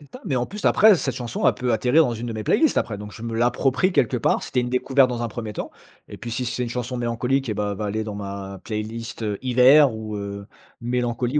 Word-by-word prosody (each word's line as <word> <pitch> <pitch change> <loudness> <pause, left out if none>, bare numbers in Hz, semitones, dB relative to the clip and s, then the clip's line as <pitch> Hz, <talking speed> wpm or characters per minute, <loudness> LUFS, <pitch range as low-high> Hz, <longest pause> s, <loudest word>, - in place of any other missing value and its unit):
Même 145 - -17
pas, 255 - -12
mais, 135 - -1
en 125 0 0
plus, 210 +2 -9
après, 215 0 +6
cette 135 -6 -2
chanson, 120 -2 -1
elle - - +3
peut 125 -2 -1
atterrir 125 +9 +4
dans 125 - -1
une 115 +1 -5
de 115 - -4
mes 110 -1 -4
playlists 315 - +2
après. 105 -3 -1
Donc, 105 0 -8
je 110 - -10
me 115 -1 -4
l'approprie 130 +9 +2
quelque 125 -5 +2
part. - - +1
C'était 125 - -1
une 125 0 -1
découverte 130 +1 +3
dans 120 -1 -3
un - - -1
1er 110 -1 -6
temps. - - -5 0.4
Et - - -10
puis, 120 - -7
si 125 +2 -2
c'est 120 +2 -3
une 120 - -2
chanson 125 +1 -4
mélancolique, 125 +2 -1
et, 105 - -2
bah, 105 -1 -1
elle 100 - -5
va 105 - -3
aller 110 +2 -2
dans 105 - -6
ma 100 -1 -6
playlist 110 +1 -5
heu, 105 -2 -2
hiver 130 +2 +6
ou, 110 -1 -6
heu, 100 0 -6 0.4
mélancolie 120 +2 -1
120 Hz, 265 wpm, -23 LUFS, 110-125 Hz, 0.4 s, après